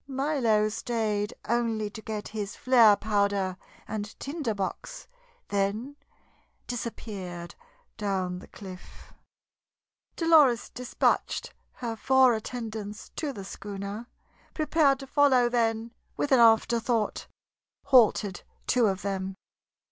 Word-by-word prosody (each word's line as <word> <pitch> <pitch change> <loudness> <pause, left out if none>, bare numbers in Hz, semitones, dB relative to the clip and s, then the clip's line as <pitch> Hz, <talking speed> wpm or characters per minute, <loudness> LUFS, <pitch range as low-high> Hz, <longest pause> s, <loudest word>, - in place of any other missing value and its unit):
Milo 265 -6 +1
stayed 215 -2 -2
only 225 -2 0
to 220 - -9
get 215 -1 -5
his 210 -2 -5
flare 235 -5 +6
powder 200 -3 0 0.3
and 210 0 -5
tinder 280 -6 -3
box, 200 - -5 0.4
then 205 +7 -1 0.7
disappeared 195 -7 -6 0.4
down 190 -4 -2
the - - -13
cliff. 185 -2 -12 1.0
Dolores 310 -8 +4
despatched 250 0 -1 0.2
her 235 -2 -4
four 260 +1 +4
attendants 220 -2 -5
to 300 -3 -2
the 200 -7 -8
schooner, 200 +3 -6 0.5
prepared 305 -3 +3
to - - -7
follow, 270 -3 +4
then, 230 -1 0 0.3
with 290 - -1
an 260 - +6
afterthought, 230 0 +3 0.6
halted 225 -8 +4 0.2
two 245 -3 +3
of 190 -1 -2
them. 195 -1 -3
225 Hz, 105 wpm, -28 LUFS, 205-250 Hz, 1.0 s, flare